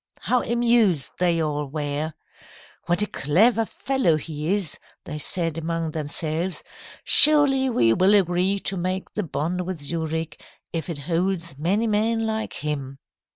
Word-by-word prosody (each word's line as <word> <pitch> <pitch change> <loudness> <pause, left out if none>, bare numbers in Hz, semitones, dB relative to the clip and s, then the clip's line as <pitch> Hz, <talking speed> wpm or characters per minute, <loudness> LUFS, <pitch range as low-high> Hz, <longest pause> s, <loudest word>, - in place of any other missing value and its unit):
How 250 -1 +1
amused 235 - +2
they 175 -2 +2
all 150 -2 -2
were! 150 +2 -3 0.7
"'What 175 +3 +2
a - - +2
clever 215 - +2
fellow 265 -12 0
he 155 +1 -4
is,' 200 -5 -1 0.3
they 150 -2 -6
said 165 0 +1
among 165 0 -3
themselves. 160 +3 -2 0.4
'Surely 280 -3 +6
we 115 - +3
will 190 - +4
agree 185 +1 +2
to 195 - -2
make 185 +2 -3
the 210 - -1
bond 175 0 -3
with 180 -2 -5
Zurich, 160 +1 -3 0.3
if 165 0 -4
it 165 - -4
holds 170 +1 -2
many 195 +8 +1
men 225 +1 +1
like 220 0 -3
him.' 140 -3 -4
170 Hz, 145 wpm, -23 LUFS, 155-210 Hz, 0.7 s, Surely